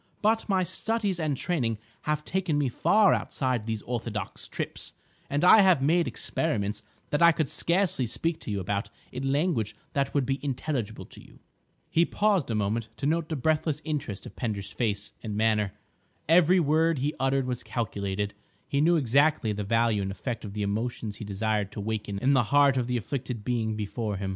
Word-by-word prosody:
But 220 +1 +2
my 190 -2 +3
studies 200 +1 -1
and 150 -4 0
training 120 -11 0 0.3
have 150 0 0
taken 185 -5 0
me 145 -3 +1
far 205 - +4
outside 125 -5 -1
these 110 -2 -2
orthodox 115 -3 -4
trips, - - -4 0.4
and 145 +3 0
I 215 - +9
have 185 -6 +5
made 165 +4 +3
experiments 105 -10 -1 0.3
that 145 - +1
I 170 0 +8
could 155 -2 0
scarcely 170 -5 +1
speak 165 +7 -1
to - - -8
you 100 -1 -1
about 100 +3 -2 0.2
in 135 +2 -2
language 140 - 0 0.2
that 140 0 -1
would 140 -2 +2
be 135 +2 -2
intelligible 135 -4 -3
to - - -14
you." - - -18 0.5
He 165 - +4
paused 200 -5 +1
a 115 - 0
moment 110 +2 -1
to - - -4
note 160 +1 +1
the 160 - -1
breathless 155 +2 0
interest 145 - -3
of - - -10
Pender's 105 -5 -3
face 105 -4 -2
and 105 -3 -4
manner. 105 -2 +2 0.6
Every 175 +3 +5
word 160 +1 +3
he 145 +4 -1
uttered 135 0 +1
was 125 -1 -3
calculated; 100 -3 -3 0.3
he 140 - +1
knew 170 +3 +4
exactly 140 -4 +3
the 105 0 -3
value 115 0 +2
and 95 - -2
effect 115 +4 -4
of 100 -2 -7
the 105 0 -2
emotions 110 +1 -3
he 110 - -7
desired 105 0 -1
to - - -6
waken 105 -1 -3
in 130 +7 +2
the 125 -4 +3
heart 140 +2 +4
of 125 -2 0
the 125 -1 0
afflicted 120 -2 -4
being 115 -3 0
before 105 0 -3
him. 95 0 -3
125 Hz, 190 wpm, -27 LUFS, 110-155 Hz, 0.6 s, I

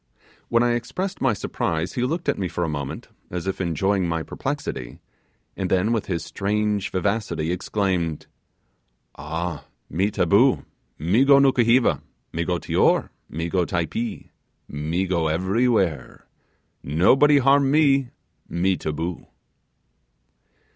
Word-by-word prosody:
When 120 0 +3
I 120 0 +2
expressed 180 +11 -3
my 135 -4 +3
surprise, 85 -4 -2
he 125 - -2
looked 160 +7 -2
at - - +1
me 95 - -1
for 90 - -3
a - - 0
moment, 70 -3 -5 0.2
as 90 -1 -4
if 95 0 -2
enjoying 95 +2 0
my 80 -1 -1
perplexity, 135 - -5 0.6
and 95 -2 -3
then 95 +4 +2
with 115 - -2
his 85 -5 -2
strange 105 0 -1
vivacity, 95 -4 -1
exclaimed, 90 -4 -1 0.9
'Ah! 80 +2 -4 0.3
Me 95 +5 +1
taboo, 105 +8 +3 0.3
me 90 - +2
go 140 0 +6
Nukuheva, 130 -3 +4 0.3
me 85 - -1
go 90 +1 -1
Tior, - - +2 0.2
me 85 +2 -3
go 90 +1 +1
Typee, 90 +7 -3 0.4
me 80 +6 -2
go 85 -3 0
everywhere, 95 - 0 0.6
nobody 130 - +4
harm 140 0 +4
me, 140 -3 +3 0.4
me 90 +2 +1
taboo. 80 +3 -4
95 Hz, 125 wpm, -23 LUFS, 85-120 Hz, 0.9 s, go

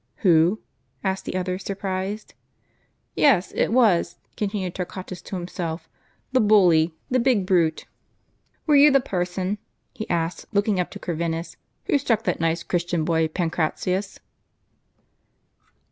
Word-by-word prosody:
" - - -48
Who? 175 +4 +4 0.2
" - - -43
asked 190 -1 -2
the - - -4
other, 185 0 -2
surprised. 195 +1 -4 0.8
"Yes, 230 -12 +4
it - - +1
was," 210 -8 +3 0.2
continued 195 -4 -2
Torquatus 185 0 -6
to - - -7
himself, 175 -2 -5 0.2
— - - -42
"the 260 - +3
bully, 175 -7 +4 0.2
the 255 - +3
big 235 -6 +2
brute. 170 -4 +1 0.8
Were 300 - +4
you 285 +1 +8
the 275 -1 +5
person," 185 -1 -2 0.3
he 220 - -7
asked, 165 0 -2
look 205 -1 +1
ing 200 -4 +1
up 180 - -1
to - - -9
Corvinus, 165 -1 -3 0.3
"who 305 -8 +2
struck 230 -5 0
that - - -1
nice 165 +1 0
Cliristian 175 -2 -1
boy 160 -1 +2
Pancratius 180 +3 -2
185 Hz, 145 wpm, -24 LUFS, 170-210 Hz, 0.8 s, you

